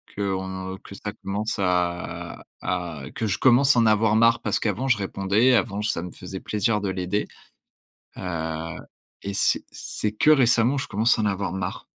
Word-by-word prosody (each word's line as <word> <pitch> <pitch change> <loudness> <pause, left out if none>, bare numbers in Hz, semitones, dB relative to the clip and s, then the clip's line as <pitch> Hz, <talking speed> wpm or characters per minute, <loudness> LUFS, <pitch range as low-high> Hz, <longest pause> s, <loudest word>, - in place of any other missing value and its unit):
qu'on 95 -1 -3
que 100 - -11
ça 105 +1 -5
commence 105 +3 -2
à 90 -2 -2 0.2
à 85 -5 -3
que 110 - -1
je 95 - 0
commence 130 +2 +5
à - - +6
en 115 - +4
avoir 110 0 +3
marre. 115 +1 +4
Parce - - 0
qu'avant 110 +5 -1
je 120 - +3
répondais, 100 +5 +2
avant 105 -3 0
ça 105 -5 -1
me 90 - -7
faisait 95 0 -6
plaisir 105 0 0
de 100 - -1
l'aider, 95 +2 -2 0.9
heu 80 -2 -4 0.5
et 100 - -4
c'est 95 - +2
c'est 105 - -3
que 110 - +3
récemment, 125 -1 +4
je 135 - -3
commence 110 +3 +2
à - - +1
en - - +1
avoir 100 -2 -1
marre. 90 -1 -4
100 Hz, 180 wpm, -24 LUFS, 95-115 Hz, 0.9 s, à